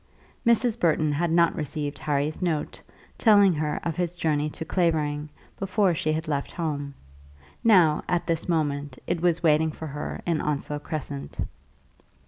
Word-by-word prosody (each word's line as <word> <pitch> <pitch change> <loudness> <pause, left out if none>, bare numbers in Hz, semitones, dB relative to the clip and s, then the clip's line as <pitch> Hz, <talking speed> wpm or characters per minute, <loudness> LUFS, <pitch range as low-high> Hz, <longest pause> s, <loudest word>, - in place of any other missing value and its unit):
Mrs. 235 0 +3
Burton 155 -2 +2
had 170 +4 0
not 170 0 +3
received 150 -1 -3
Harry's 150 +2 -1
note, 165 -4 -2 0.4
telling 205 -4 +6
her 150 -1 -1
of 165 -1 -3
his 175 -1 -1
journey 150 -3 0
to 160 - -7
Clavering, 155 -4 0 0.3
before 195 -1 +2
she 155 -1 0
had 155 +1 -2
left 140 -2 -2
home. 145 -5 -3 0.7
Now 180 -9 +5
at 175 -1 +1
this 165 0 -1
moment 145 -4 -1
it 170 - -1
was 170 -1 +2
waiting 160 0 +4
for 160 - -8
her 150 0 -5
in 170 -3 0
Onslow 150 0 -2
Crescent. 100 - -6
155 Hz, 150 wpm, -26 LUFS, 150-175 Hz, 0.7 s, telling